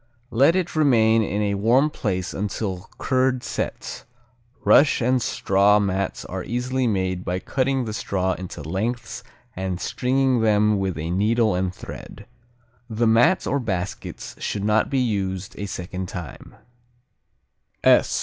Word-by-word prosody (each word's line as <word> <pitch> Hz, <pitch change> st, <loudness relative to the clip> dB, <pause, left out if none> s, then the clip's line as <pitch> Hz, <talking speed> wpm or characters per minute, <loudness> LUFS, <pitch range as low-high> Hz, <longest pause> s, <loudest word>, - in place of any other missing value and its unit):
Let 140 Hz, +9 st, +4 dB
it 180 Hz, -3 st, -1 dB
remain 115 Hz, -7 st, +4 dB
in 105 Hz, 0 st, -1 dB
a 100 Hz, -1 st, 0 dB
warm 120 Hz, +9 st, +3 dB
place 95 Hz, -, -2 dB
until 100 Hz, -2 st, -4 dB
curd 130 Hz, -1 st, +1 dB
sets. -, -, -4 dB, 0.6 s
Rush 145 Hz, -, +5 dB
and 125 Hz, +1 st, +2 dB
straw 100 Hz, 0 st, +3 dB
mats 100 Hz, -1 st, -2 dB
are -, -, -5 dB
easily 125 Hz, +2 st, -1 dB
made 95 Hz, -3 st, -1 dB
by 90 Hz, 0 st, -2 dB
cutting 130 Hz, +5 st, -1 dB
the 110 Hz, -, -4 dB
straw 95 Hz, -3 st, -1 dB
into 90 Hz, -5 st, -7 dB
lengths 115 Hz, +9 st, -3 dB, 0.3 s
and 95 Hz, -1 st, -3 dB
stringing 130 Hz, +1 st, +1 dB
them 105 Hz, -1 st, +3 dB
with 95 Hz, -4 st, -2 dB
a 80 Hz, +2 st, -3 dB
needle 110 Hz, +3 st, +2 dB
and 90 Hz, 0 st, 0 dB
thread. -, -, -10 dB, 0.6 s
The 115 Hz, +1 st, 0 dB
mats 115 Hz, +11 st, +4 dB
or 140 Hz, -, 0 dB
baskets 95 Hz, -6 st, -4 dB
should 100 Hz, -, -3 dB
not 105 Hz, +1 st, +2 dB
be 135 Hz, -, 0 dB
used 95 Hz, -6 st, -1 dB
a 100 Hz, -, -3 dB
second 90 Hz, 0 st, -5 dB
time. 85 Hz, -6 st, -8 dB
105 Hz, 140 wpm, -23 LUFS, 95-125 Hz, 0.6 s, Rush